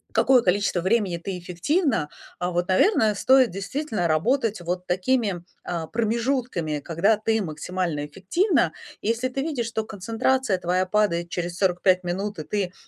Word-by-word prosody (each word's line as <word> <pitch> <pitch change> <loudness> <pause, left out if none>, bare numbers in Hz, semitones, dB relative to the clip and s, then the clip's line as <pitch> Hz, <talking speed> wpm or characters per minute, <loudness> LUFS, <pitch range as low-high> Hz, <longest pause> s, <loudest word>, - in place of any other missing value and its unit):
какое 255 -3 +5
количество 190 -1 +1
времени 190 -3 +1
ты 180 +1 -5
эффективна, 200 - 0 0.3
а 180 0 -2
вот, 175 0 -1
наверное, 215 - +3
стоит 260 +4 +5
действительно 200 - -2
работать 215 - +1
вот 180 +1 -3
такими, 190 -1 0 0.2
а, 170 -2 -4
промежутками, 230 - -1
когда 185 +8 +2
ты 220 0 0
максимально 160 -2 -3
эффективна. 195 - +1 0.3
Если 235 +4 0
ты 270 +1 -3
видишь, 280 -5 -2
что 225 -1 -2
концентрация 225 +1 0
твоя 180 +1 +1
падает 185 -4 +1
через 175 0 -4
45 185 -1 +2
минут, 195 +4 -3
и 155 - -4
ты, 190 0 -2
195 Hz, 145 wpm, -24 LUFS, 175-230 Hz, 0.3 s, какое